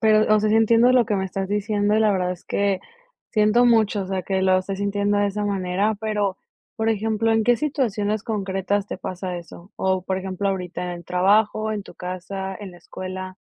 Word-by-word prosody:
pero, 215 -1 +4
o - - +5
sea, 215 0 +1
sí - - +3
entiendo 230 +2 +5
lo 245 -3 +4
que 210 - 0
me 190 - -1
estás 190 0 -3
diciendo 205 0 +1
y - - +3
la 215 -2 +4
verdad 180 -1 0
es 180 -1 -7
que 200 -2 0 0.5
siento 215 +3 +4
mucho, 220 -4 +3
o - - -6
sea, 190 -1 -2
que 190 0 -1
lo 185 0 +4
estés 195 +1 -4
sintiendo 205 0 0
de 205 0 +2
esa 205 +1 -2
manera, 195 +2 0
pero, 210 -3 -1 0.4
por 220 0 +1
ejemplo, 220 +1 +1
¿en 225 0 +3
qué 240 +2 +4
situaciones 215 -8 -1
concretas 200 -2 -1
te - - -6
pasa 185 -1 -5
eso? 170 +2 -13
¿O, 190 -1 0
por 190 0 -2
ejemplo, 190 +1 -2
ahorita, 180 -2 -4
en 180 - -3
el 175 -1 -7
trabajo, 210 +4 +2
en 210 -1 -3
tu - - -14
casa, 190 +1 -5
en 200 -2 -7
la - - -14
escuela? 185 +1 -7
200 Hz, 220 wpm, -23 LUFS, 185-215 Hz, 0.5 s, o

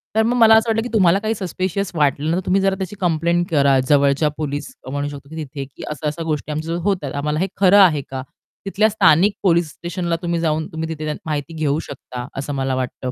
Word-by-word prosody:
तर 220 - +4
मग 240 +2 +1
मला 225 -1 +7
असं 225 +1 +3
वाटलं, 225 0 +1
की 245 - -5
तुम्हाला 190 -2 +4
काही 220 +1 -1
सस्पिशियस 190 +1 -3
वाटलं 150 0 +1
ना, - - +1
तर 190 - -4
तुम्ही 195 +1 +2
जरा 195 0 +2
त्याची 190 +1 -5
कंप्लेंट 170 0 +1
करा 140 -3 +4
जवळच्या 140 +1 +3
पोलिस 150 - -4 0.2
म्हणू 145 0 -2
शकतो, 140 -1 -9
की 160 - -10
तिथे 140 -1 -7
की 135 - -13
अशा-अशा 150 +2 -3
गोष्टी 155 -1 -3
आमच्या 155 +2 -4
जवळ 175 - -3
होतात. 180 -9 -1
आम्हाला 150 +2 -1
हे 190 - +1
खरं 195 +1 +5
आहे 165 -7 +5
का? 130 -1 -4 0.4
तिथल्या 205 +2 +2
स्थानिक 200 -1 +4
पोलिस 170 -3 +3
स्टेशनला 175 0 -3
तुम्ही 170 -1 -1
जाऊन, 160 -1 0
तुम्ही 160 0 -4
तिथे 155 -1 -3
माहिती 155 +1 -3
घेऊ 155 -2 0
शकता 125 -4 -8
असं 140 +1 -4
मला 135 -1 -1
वाटतं. 130 0 -4
160 Hz, 220 wpm, -20 LUFS, 145-190 Hz, 0.4 s, मला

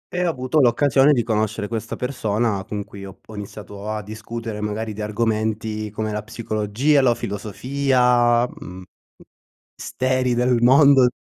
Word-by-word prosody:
E 180 - 0
ho 175 - +2
avuto 130 0 0
l'occasione 135 +3 +4
di 120 -5 +2
conoscere 110 -1 -1
questa 115 -1 -4
persona 110 -5 -1
con 105 -1 -4
cui 100 0 -11
ho 95 -1 -9
p - - -39
ho 110 - -9
iniziato 105 0 -8
a 110 -1 -3
discutere 110 +1 -6
magari 105 +1 -3
di 105 - -7
argomenti 110 0 -2
come 110 +1 -4
la 105 0 -3
psicologia, 115 +5 0
la 120 -2 +3
filosofia, 120 +2 +1
mhmm, 95 -5 -10 0.9
misteri 130 +1 -1
del 125 0 +2
mondo 135 +1 +6
115 Hz, 150 wpm, -21 LUFS, 105-125 Hz, 0.9 s, mondo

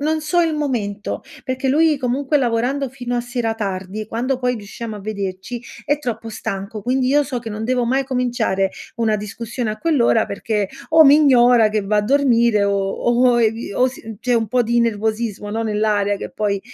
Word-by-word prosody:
non 310 +2 0
so 345 +3 +1
il 325 -2 +1
momento, 220 -9 -3 0.2
perché 260 0 -2
lui, 310 +2 +3
comunque, 270 +3 0
lavorando 255 +2 0
fino 245 -1 -4
a - - +1
sera 240 -2 -2
tardi 195 -1 -4
e - - -9
quando 250 +4 -2
poi 250 -1 0
riusciamo 220 +1 -7
a - - -9
vederci, 200 +2 -5 0.2
è 290 +1 +1
troppo 230 -5 -4
stanco. 200 0 -5
Quindi 255 +2 +1
io 290 +2 +4
so 255 -2 -3
che 230 - -7
non 215 +1 -4
devo 250 0 +1
mai 265 +3 +1
cominciare 240 -7 0 0.3
una 220 -2 +1
discussione 225 +3 -4
a 215 - -5
quell'ora, 260 -9 +2
perché 205 0 -2 0.2
o 320 -1 +7
mi 285 +1 +8
ignora, 245 -6 +5
che 215 0 0
va 210 +2 0
a 210 - +3
dormire 235 -4 +3
o 200 0 +1
o 240 +3 +2
i 225 -1 0
o 255 - +3
si 225 -4 -9
c'è 245 -1 +1
un 225 -1 +1
po' 245 +3 +2
di 235 +1 +1
nervosismo, 220 -1 -1
no, 225 +2 -2
nell'aria. 210 -2 +1
Che - - -7
poi 200 -2 -1
235 Hz, 195 wpm, -20 LUFS, 215-255 Hz, 0.3 s, mi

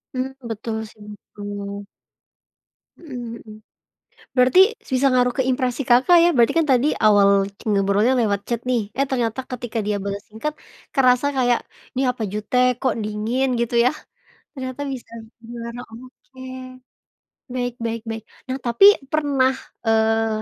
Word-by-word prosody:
Mmm, 260 +1 -2 0.2
betul 220 +1 -4
sih 215 - -20
itu. 205 - -25 1.6
Mhm 245 -7 -8
mhm. 215 - -12 0.8
Berarti, 255 +8 +5 0.2
s - - -17
bisa 275 +2 +3
ngaruh 250 -1 +3
ke - - +3
impresi 255 0 0
Kakak, 260 +8 +6
ya. 345 - +5
Berarti 235 -2 +4
kan 320 - +2
tadi, 255 +3 +3 0.2
awal 200 -1 +5
c - - -17
ngobrolnya 200 +5 +2
lewat 205 -4 +1
chat 235 -1 -2
nih, 245 -3 +2 0.2
eh, 275 - +3
ternyata 240 -2 -1
ketika 240 -2 -4
dia 210 -1 0
bales 200 +1 -4
singkat, 230 +8 -4 0.4
kerasa 255 +1 +3
kayak, 245 -2 +3 0.4
"Nih 265 +1 +1
apa 240 -3 -6
jutek? 250 +4 +1
Kok 260 -4 +1
dingin?" 215 +5 -1
Gitu, 235 0 -1
yah. 305 - +2 0.6
Ternyata 260 -1 -6
bisa 245 -3 -9 0.3
dibilang, 235 0 -8
oke, 255 +3 -14 1.1
baik 245 -1 -2
baik 230 0 -2
baik. 225 -1 -5 0.3
Nah, 260 - -1
tapi 235 +11 +5 0.3
pernah, 280 -4 +2 0.3
eee, 220 0 +2
240 Hz, 145 wpm, -22 LUFS, 220-260 Hz, 1.6 s, Kakak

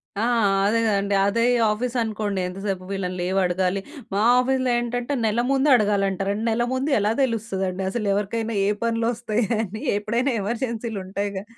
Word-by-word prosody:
ఆ! 205 - -2 0.4
అదే 225 +3 +2
గదండి. 200 -1 +1
అదే 230 +3 +1 0.3
ఆఫీస్ 240 +3 -3
అనుకోండి 210 -3 -2
ఎంతసేపు 190 0 -4
వీళ్ళని 185 -2 -3
లీవడగాలి. 185 +1 0 0.3
మా 200 - +1 0.2
ఆఫీస్‌లో 260 0 +1
ఏంటంటే 240 +3 -2
నెల 220 +2 +1
ముందే 275 +2 +3
అడగాలంటా. 200 -3 +1
రెన్నెల్ల 225 +3 0
ముండు 270 +3 -1
ఎలా 210 +1 +1
తెలుస్తదండి. 195 -6 -2
అసలెవరికైనా 215 +1 -1
ఏ - - +2 0.2
పనులోస్తాయని? 230 -2 -1
ఎప్పుడైనా 235 +6 0
ఎమర్జెన్సీలు 230 0 -3
ఉంటాయిగా. 200 0 -3
215 Hz, 130 wpm, -23 LUFS, 195-235 Hz, 0.4 s, ముందే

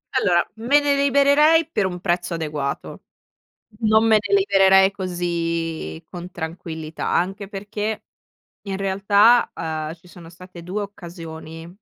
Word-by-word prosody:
Allora, 175 -3 +2
me 250 +6 +3
ne 285 -1 +1
libererei 285 +3 +4
per 195 - +1
un 180 -1 -6
prezzo 175 -1 -1
adeguato. 150 -4 -4 0.8
Non 220 0 +3
me 220 -1 +5
ne 200 -1 +1
libererei 195 -1 +5
così 170 - -3
con 180 +1 -8
tranquillità. 160 -1 -6
Anche 195 +3 -1
perché, 205 +2 -4 0.6
in 195 -1 -3
realtà, 200 +4 +3
uhm, 155 0 -4
ci 175 +1 -22
sono 170 -2 -13
state 180 0 -13
2 195 +4 -4
occasioni 165 -4 -9
185 Hz, 125 wpm, -22 LUFS, 170-205 Hz, 0.8 s, me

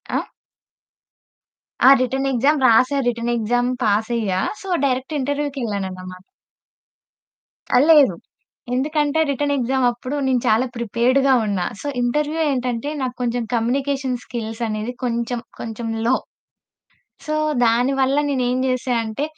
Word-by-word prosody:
ఆ! - - 0 1.6
ఆ! - - +10
Written 265 +2 -1
exam 275 +4 +2
రాసా 255 +5 +4
రిటెన్ 235 0 -1
ఎక్సామ్ 245 +2 0
పాసయ్యా. 215 -2 0 0.2
So, 390 - -10 0.2
direct 260 +3 -1
ఇంటర్వ్యూకెళ్ళానన్నమాట. 210 -10 -4 1.5
ఆ! - - +5
లేదు. 290 - +6 0.6
ఎందుకంటే 295 +3 0
రిటెన్ 285 +1 0
ఎక్సామప్పుడు 255 0 0
నేను 255 -2 +1
చాలా 220 +4 +3
ప్రిపేర్డ్‌గా 245 +4 +2
ఉన్నా, 195 -4 -1
సో, - - -6
ఇంటర్వ్యూ 295 +6 0
ఏంటంటే 250 0 -2
నాక్కొంచెం 245 -1 -2
కమ్యూనికేషన్ 265 +3 0
స్కిల్స్ 225 -1 -6
అనేది 215 +2 -3
కొంచెం 235 0 -1 0.2
కొంచెం 225 0 -5 0.2
లో. 260 +2 +4 1.1
సో, 305 - -1 0.3
దాని 240 +3 +2
వల్ల 265 +1 +2
నేనేం 255 -2 0
చేశా 255 0 -1
అంటే, 220 +6 -3
245 Hz, 110 wpm, -21 LUFS, 230-270 Hz, 1.6 s, ఆ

